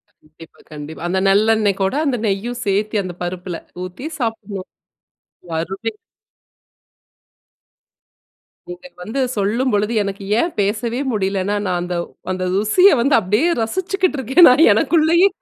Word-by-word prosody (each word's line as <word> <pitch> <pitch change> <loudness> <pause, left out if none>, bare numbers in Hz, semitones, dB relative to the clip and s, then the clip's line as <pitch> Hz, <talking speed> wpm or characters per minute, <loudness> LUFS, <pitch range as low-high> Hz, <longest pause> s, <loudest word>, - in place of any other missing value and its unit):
கண்டிப்பா, 155 +1 -18
கண்டிப்பா. 150 +1 -9
அந்த 190 +2 0
நல்லெண்ணெய் 210 0 +3
கூட 195 +7 0
அந்த 265 -4 0
நெய்யும் 230 +5 -2
சேர்த்து 210 +1 0
அந்த 185 -1 -6
பருப்பில 180 -1 -5 0.3
ஊத்தி 185 +11 -8
சாப்பிடணும். 215 -5 -4 0.8
வருவி. 190 +7 -3 2.8
நீங்க 175 +10 -9
வந்து 220 +9 -4 0.2
சொல்லும்பொழுது 210 +1 0
எனக்கு 200 0 -5 0.2
ஏன் 340 - 0
பேசவே 225 +5 -1
முடியலைன்னா, 195 -1 -1
நான் 180 -1 0
அந்த 175 0 -4 0.4
அந்த 185 0 -3
ருசியை 215 - +4
வந்து 275 +3 +3
அப்டியே 215 - +1
ரசிச்சுக்கிட்டு 370 - -1
இருக்கேன் 265 +8 +6
நான் 275 +6 +5
எனக்குள்ளயே. 335 - +3
210 Hz, 115 wpm, -19 LUFS, 190-250 Hz, 2.8 s, இருக்கேன்